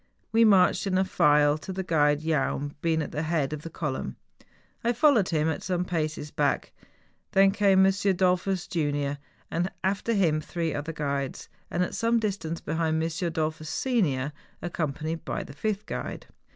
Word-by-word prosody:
We 225 +1 +5
marched 195 -1 +4
in 185 -1 +1
a 190 - +3
file, 150 -4 +4
the 190 +4 -5
guide 150 -3 +2
Jaun 145 -2 -1
being 160 -1 +1
at - - -7
the 150 - -2
head 155 -3 0
of 150 - -5
the 165 - -7
column. 140 - -4 0.7
I 240 +1 +2
followed 240 -6 +4
him 155 -2 +1
at 160 - -1
some 180 -1 -1
paces 155 -3 -2
back: 145 -2 0 0.6
then 195 0 +6
came 195 -2 +4
M. 195 - +5
Dollfus, 185 -1 +1
junior; 145 -5 -1 0.6
after 200 +4 0
him 165 -7 +2
three 165 0 -3
other 145 +3 -3
guides, 140 -3 -3 0.2
and 180 - 0
at - - -3
some 230 0 +2
distance 190 -6 -3
behind, 160 0 0
M. 160 +1 +1
Dollfus, 160 -2 -2
senior, 155 - 0 0.3
ac¬ 175 - -4
companied 160 +1 -3
by - - -3
the - - -11
fifth 215 -1 -2
guide. - - -5
165 Hz, 165 wpm, -27 LUFS, 150-190 Hz, 0.7 s, then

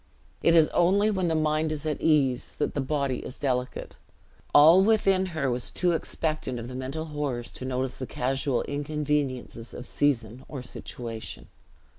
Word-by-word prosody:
It 165 - +4
is 160 -2 +7
only 200 +5 +3
when 190 -3 0
the 165 - +1
mind 155 0 +1
is 155 0 -4
at 155 -1 -2
ease, 135 -6 +2
that - - -1
the 145 - -1
body 135 -2 -1
is 130 - -8
delicate; 125 -2 -2 0.5
all 160 +6 +8
within 195 -3 +3
her 155 -7 -1
was 120 0 -3
too 180 -1 +1
expectant 155 -5 -2
of 120 +2 -6
mental 135 +5 -4
horrors 140 -6 -3
to 130 - -7
notice 130 0 -2
the 130 - -5
casual 135 +1 -1
inconveniences 145 -5 -2
of 125 - -7
season 125 -4 0
or 135 -4 -6
situation. 115 - -7
145 Hz, 160 wpm, -27 LUFS, 125-155 Hz, 0.5 s, all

